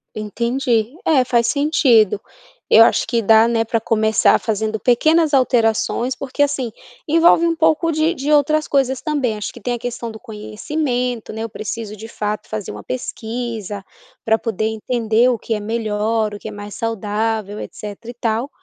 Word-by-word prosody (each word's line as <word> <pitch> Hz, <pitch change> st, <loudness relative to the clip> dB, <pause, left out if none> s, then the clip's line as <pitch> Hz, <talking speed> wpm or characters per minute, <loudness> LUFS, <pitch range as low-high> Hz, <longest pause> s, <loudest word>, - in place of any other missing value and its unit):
Entendi, 235 Hz, +3 st, -1 dB
é 285 Hz, -5 st, +4 dB
faz 240 Hz, -2 st, +1 dB
sentido, 245 Hz, -, +3 dB, 0.5 s
eu 225 Hz, -, +8 dB
acho -, -, +3 dB
que 230 Hz, 0 st, +1 dB
dá, 220 Hz, +2 st, +5 dB
né, 230 Hz, -1 st, +1 dB
pra 225 Hz, 0 st, -1 dB
começar 220 Hz, 0 st, +3 dB
fazendo 220 Hz, 0 st, -2 dB
pequenas 310 Hz, -, +3 dB
alterações, 245 Hz, 0 st, +2 dB
porque 275 Hz, +2 st, -4 dB
assim, 270 Hz, -5 st, -1 dB, 0.4 s
envolve 330 Hz, +2 st, +5 dB
um 335 Hz, -1 st, +1 dB
pouco 325 Hz, 0 st, +2 dB
de 315 Hz, +2 st, +1 dB
de 285 Hz, +2 st, -2 dB
outras 305 Hz, +1 st, +3 dB
coisas 265 Hz, -2 st, +1 dB
também. 265 Hz, -8 st, -1 dB
Acho 210 Hz, -, -5 dB
que 240 Hz, -, -12 dB
tem 245 Hz, -, -2 dB
a -, -, -7 dB
questão 235 Hz, -1 st, -5 dB
do 220 Hz, -, -10 dB
conhecimento, 245 Hz, +2 st, -3 dB
né, 220 Hz, +1 st, -5 dB
eu 230 Hz, -, -4 dB
preciso 215 Hz, 0 st, -6 dB
de 220 Hz, +2 st, -9 dB
fato 210 Hz, -1 st, -4 dB
fazer 215 Hz, -, -4 dB
uma 105 Hz, 0 st, -9 dB
pesquisa, 220 Hz, -, -5 dB, 0.4 s
pra 220 Hz, 0 st, +3 dB
poder 220 Hz, -2 st, -2 dB
entender 225 Hz, +1 st, +1 dB
o 245 Hz, -, +1 dB
que 225 Hz, -, -3 dB
é 210 Hz, -, -1 dB
melhor, 215 Hz, 0 st, -1 dB
o 205 Hz, -, -7 dB
que -, -, -8 dB
é -, -, -5 dB
mais 205 Hz, 0 st, -8 dB
saudável, 215 Hz, -1 st, -2 dB
etcetera 210 Hz, +3 st, -8 dB
e -, -, -13 dB
tal. 230 Hz, +4 st, -1 dB
230 Hz, 175 wpm, -19 LUFS, 215-255 Hz, 0.5 s, eu